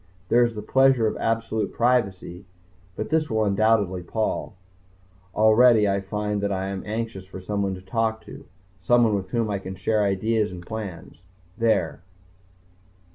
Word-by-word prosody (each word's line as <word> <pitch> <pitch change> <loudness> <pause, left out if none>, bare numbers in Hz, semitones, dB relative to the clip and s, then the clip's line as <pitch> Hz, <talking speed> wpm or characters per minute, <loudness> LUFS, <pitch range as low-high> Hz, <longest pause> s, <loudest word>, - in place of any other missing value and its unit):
There 120 +1 +5
is 120 -1 -1
the 105 - -6
pleasure 130 0 +3
of 110 - 0
absolute 115 -1 -1
privacy. 100 -7 0 0.5
But 110 - -4
this 155 0 +1
will 110 -1 +1
undoubtedly 100 -2 +2
pall. 110 +3 -3 0.8
Already 110 0 +5
I 100 0 0
find 105 +1 -3
that 100 0 -1
I 95 0 -2
am 95 -1 -4
anxious 110 -3 -4
for 95 - -9
someone 100 0 -2
to 95 - -12
talk 110 +3 -1
to, - - -11 0.4
someone 120 +2 +3
with 95 -2 -2
whom 115 -1 -1
I 100 - -1
can 95 0 -7
share 105 +3 0
ideas 105 +2 0
and 90 -1 -9
plans. 100 -6 -7 0.3
There 100 -10 0
105 Hz, 155 wpm, -24 LUFS, 95-115 Hz, 0.8 s, There